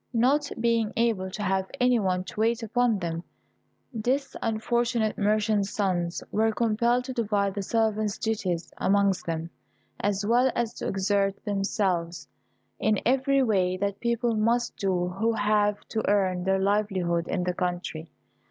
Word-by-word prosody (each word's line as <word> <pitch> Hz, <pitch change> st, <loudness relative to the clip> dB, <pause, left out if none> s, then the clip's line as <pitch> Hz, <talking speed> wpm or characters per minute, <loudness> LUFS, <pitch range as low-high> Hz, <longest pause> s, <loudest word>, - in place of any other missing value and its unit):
Not 275 Hz, +5 st, +2 dB
being 230 Hz, -2 st, +1 dB
able 225 Hz, -5 st, +1 dB
to 210 Hz, +3 st, -5 dB
have 190 Hz, -1 st, 0 dB
any 250 Hz, -1 st, +4 dB
one 185 Hz, -3 st, 0 dB
to 200 Hz, -, -9 dB
wait 230 Hz, +1 st, +1 dB
upon 240 Hz, 0 st, +1 dB
them, 170 Hz, -2 st, -4 dB, 0.7 s
this 255 Hz, +5 st, -1 dB
unfortunate 230 Hz, 0 st, 0 dB
merchant's 210 Hz, -1 st, +1 dB
sons 180 Hz, -5 st, -1 dB
were 220 Hz, +1 st, +2 dB
compelled 235 Hz, +2 st, +1 dB
to 260 Hz, 0 st, -5 dB
divide 205 Hz, -4 st, 0 dB
the 200 Hz, -, -3 dB
servant's 215 Hz, 0 st, 0 dB
duties 185 Hz, -7 st, -2 dB
amongst 200 Hz, -2 st, +2 dB
them, 165 Hz, 0 st, -3 dB, 0.5 s
as 205 Hz, 0 st, -1 dB
well 245 Hz, +4 st, +3 dB
as 235 Hz, -2 st, -1 dB
to -, -, -3 dB
exert 195 Hz, 0 st, 0 dB
themselves 195 Hz, -4 st, -1 dB, 0.5 s
in 215 Hz, -2 st, +2 dB
every 270 Hz, +2 st, +3 dB
way 185 Hz, -6 st, +1 dB
that 200 Hz, +1 st, -2 dB
people 235 Hz, -1 st, 0 dB
must 235 Hz, +2 st, +1 dB
do 180 Hz, -3 st, 0 dB
who 220 Hz, +5 st, 0 dB
have 210 Hz, -1 st, +2 dB
to 220 Hz, -, -1 dB
earn 185 Hz, -3 st, +1 dB
their 190 Hz, 0 st, +2 dB
livelihood 190 Hz, -4 st, 0 dB
in 180 Hz, -, -1 dB
the 180 Hz, 0 st, -1 dB
country. 175 Hz, -3 st, -3 dB
210 Hz, 150 wpm, -27 LUFS, 190-230 Hz, 0.7 s, any